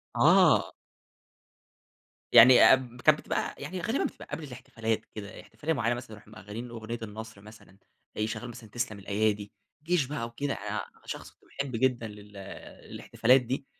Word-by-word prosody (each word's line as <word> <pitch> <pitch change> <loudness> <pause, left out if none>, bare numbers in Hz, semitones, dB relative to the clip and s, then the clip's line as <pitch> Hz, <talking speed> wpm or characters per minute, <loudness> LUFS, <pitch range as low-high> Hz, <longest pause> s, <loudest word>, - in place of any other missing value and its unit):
آه. - - +5 1.6
يعني 120 +2 +9
اب 125 -2 -2
كانت 155 0 +5
بتبقى - - -3
يعني 175 +6 -6
غالبًا 225 +9 0
بتبقى - - -5
قبل 155 +2 -4
الاحتفالات 115 -4 -4
كده، 105 -2 -8
احتفالية 160 +2 -3
معيّنة 120 -4 0
مثلًا 120 -2 -9
نروح 110 -1 -13
مشّغلين 110 +3 -8
أغنية 115 0 -6
النصر 110 -1 -9
مثلًا، 105 -2 -16 0.4
يشّغلوا 110 +2 -3
مثلًا 115 -2 -11
تسلم 115 -2 -3
الأيادي، 105 +1 -1 0.3
جيش 170 -3 +1
بقى 140 -3 -4
وكده، 135 +4 -3
أنا - - -4 0.2
شخص - - -7 0.3
محب 140 -3 -2
جدًا 120 -1 +1
لل 105 -1 -13 0.5
الاحتفالات 125 +3 +3
دي، 130 +3 -4
115 Hz, 145 wpm, -28 LUFS, 110-130 Hz, 1.6 s, يعني